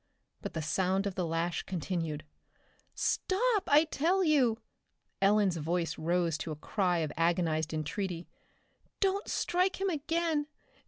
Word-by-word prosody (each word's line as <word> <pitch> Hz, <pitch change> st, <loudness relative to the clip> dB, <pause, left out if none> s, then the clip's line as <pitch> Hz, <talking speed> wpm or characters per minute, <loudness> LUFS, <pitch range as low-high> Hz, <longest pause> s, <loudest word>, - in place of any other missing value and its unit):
But -, -, -5 dB
the 160 Hz, -, -2 dB
sound 190 Hz, +5 st, +1 dB
of 200 Hz, -, -1 dB
the 180 Hz, -2 st, -2 dB
lash 165 Hz, +1 st, -1 dB
continued. 165 Hz, -4 st, -3 dB, 0.7 s
"Stop, 420 Hz, +1 st, +1 dB
I 295 Hz, +2 st, +7 dB
tell 335 Hz, +4 st, +1 dB
you!" 270 Hz, -9 st, +3 dB, 0.6 s
Ellen's 200 Hz, -2 st, +4 dB
voice 165 Hz, +2 st, -1 dB
rose 170 Hz, -1 st, +1 dB
to -, -, -4 dB
a 155 Hz, -, -3 dB
cry 180 Hz, +3 st, 0 dB
of 150 Hz, -, -6 dB
agonized 165 Hz, -2 st, +1 dB
entreaty. 170 Hz, +3 st, -3 dB, 0.7 s
"Don't 395 Hz, +1 st, +1 dB
strike 365 Hz, +2 st, 0 dB
him 390 Hz, 0 st, +1 dB
again. 315 Hz, 0 st, 0 dB
190 Hz, 130 wpm, -31 LUFS, -, 0.7 s, I